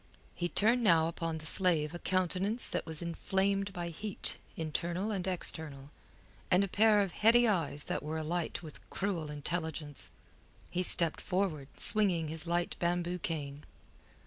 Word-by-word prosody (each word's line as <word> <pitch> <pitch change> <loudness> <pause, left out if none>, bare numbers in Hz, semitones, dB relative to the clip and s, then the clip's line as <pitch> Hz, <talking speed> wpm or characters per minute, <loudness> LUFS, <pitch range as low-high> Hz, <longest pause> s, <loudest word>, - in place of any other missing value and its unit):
He 175 0 -2
turned 230 +7 +2
now 165 -7 +4
upon 165 -1 -3
the 155 - -10
slave 165 -3 +1
a 175 - -6
countenance 190 +6 +3
that - - -3
was 160 +1 -5
inflamed 195 +3 0
by 175 -2 -5
heat 205 +5 -3 0.2
internal 170 +5 -2
and 190 -3 -3
external, 150 -6 -2 0.6
and 185 +1 +4
a - - -1
pair 210 +2 +4
of 195 -3 -1
heady 235 +4 +4
eyes 160 -8 0
that - - -3
were 155 +2 -4
alight 165 +2 -3
with 155 - -10
cruel 180 -6 -3
intelligence. 150 0 -2 0.6
He 180 - 0
stepped 170 -2 +4
forward 180 -7 -1
swinging 180 -7 +2
his 160 +2 -5
light 175 0 0
bamboo 175 +1 -1
cane. 145 -3 -4
175 Hz, 150 wpm, -32 LUFS, 160-195 Hz, 0.6 s, now